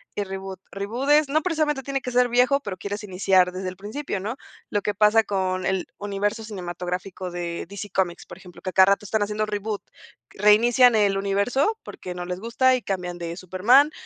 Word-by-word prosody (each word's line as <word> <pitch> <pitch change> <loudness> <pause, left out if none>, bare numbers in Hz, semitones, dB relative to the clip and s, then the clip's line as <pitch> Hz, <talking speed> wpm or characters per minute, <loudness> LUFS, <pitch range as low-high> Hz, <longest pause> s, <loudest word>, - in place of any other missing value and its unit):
y 205 - -1
reboot. 190 -1 -7
Reboot 225 +8 -3
es 300 -1 +5
no 310 +2 +2
precisamente 305 -6 0
tiene 275 -1 -2
que 250 - -5
ser 245 0 +3
viejo, 255 +4 +3
pero 195 -6 -6
quieres 205 +1 -5
iniciar 185 -1 +2
desde 185 0 -5
el 185 - -9
principio, 210 +2 -4
¿no? 225 +6 -4 0.3
Lo 205 - 0
que 210 - -1
pasa 215 +2 +5
con 185 -2 -1
el 190 -2 -1
universo 205 +2 -2
cinematográfico 180 -1 -5
de 175 -1 -4
DC 200 +1 -7
Comics, 180 -3 -1
por - - -11
ejemplo, 180 -2 -14
que 185 - -3
a - - -37
cada 190 0 +7
rato 205 - -5
están 220 +2 -1
haciendo 210 +1 0
reboot, 210 0 -3 0.5
reinician 230 +4 +5
el 200 -2 +3
universo 200 - +1
porque 180 -1 -8
no 180 - -5
les 180 +1 -4
gusta 255 +4 +3
y 255 - -3
cambian 180 -3 -4
de 170 0 -5
Superman. 220 - +4
205 Hz, 200 wpm, -24 LUFS, 185-240 Hz, 0.5 s, cada